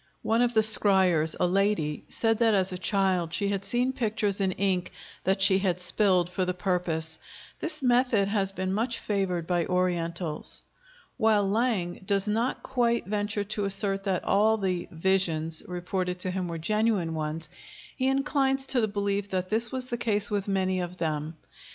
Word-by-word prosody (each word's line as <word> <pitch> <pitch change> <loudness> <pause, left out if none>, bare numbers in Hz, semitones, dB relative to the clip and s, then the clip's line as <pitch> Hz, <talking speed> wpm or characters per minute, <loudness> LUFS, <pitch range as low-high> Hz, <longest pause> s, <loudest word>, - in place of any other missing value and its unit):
One 225 +2 +2
of 245 -1 +1
the 220 - +6
scryers, 190 -7 +3
a - - +3
lady, 180 -5 0
said 225 -1 0
that 225 -3 +4
as 190 -1 +1
a 180 - -3
child 185 -4 +1
she 200 - 0
had 200 -1 -2
seen 245 +4 0
pictures 215 -5 0
in 190 -1 +2
ink 185 -2 0 0.3
that 195 +1 +2
she 190 0 +5
had 185 -2 0
spilled 180 0 +2
for 185 +1 -2
the 180 0 -1
purpose. 175 -4 -2 0.4
This 305 -3 -4
method 245 -5 +3
has 200 -2 0
been 190 -1 -2
much 230 +3 0
favored 190 -5 -1
by 175 -1 0
Orientals. 170 -3 -1 0.5
While 220 -4 +3
Lang 200 -5 0
does 195 0 0
not 225 +4 -1
quite 240 -3 +1
venture 205 +1 -1
to 205 - -1
assert 195 0 -1
that 190 -3 0
all 215 +2 +3
the 185 -4 -2
"visions" 165 -2 0
reported 180 0 -3
to 185 - -1
him 185 -1 -2
were 170 -1 -4
genuine 210 -1 +1
ones, 155 +1 -4 0.5
he 260 - 0
inclines 270 0 +1
to 265 -2 +1
the 220 - +2
belief 200 -1 -2
that 185 -1 -2
this 225 +1 0
was 260 -1 -3
the 240 - -2
case 215 -2 +1
with 205 -1 -1
many 190 -1 0
of 180 0 -5
them. 155 -1 -3
195 Hz, 175 wpm, -27 LUFS, 180-220 Hz, 0.5 s, the